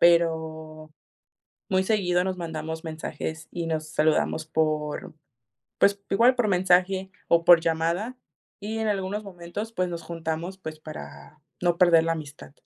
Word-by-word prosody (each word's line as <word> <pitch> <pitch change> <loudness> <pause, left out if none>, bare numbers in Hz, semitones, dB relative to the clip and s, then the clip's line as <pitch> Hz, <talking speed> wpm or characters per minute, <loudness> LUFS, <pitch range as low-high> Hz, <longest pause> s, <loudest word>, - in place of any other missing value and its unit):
pero, 160 -2 +2 0.8
muy 190 0 +2
seguido 180 -4 +2
nos 190 -1 -2
mandamos 160 -1 -5
mensajes 160 0 -5
y 170 -1 -3
nos 155 -1 -2
saludamos 155 0 +1
por, 155 +2 -1 0.6
pues, 200 0 +4
igual 235 +6 +5
por 240 -4 +1
mensaje 185 +1 +2 0.2
o 170 0 +4
por 175 -1 +8
llamada, 170 +9 -1 0.4
y 220 +2 -4
en 220 - 0
algunos 205 +1 -2
momentos, 190 +4 -6
pues, 185 -3 0
nos 170 -1 -5
juntamos, 165 +2 -4
pues, 155 -4 -7
para 150 - -10 0.2
no 175 -1 +2
perder 170 -2 +6
la 165 - +1
amistad. 150 -3 -8
170 Hz, 140 wpm, -26 LUFS, 160-190 Hz, 0.8 s, por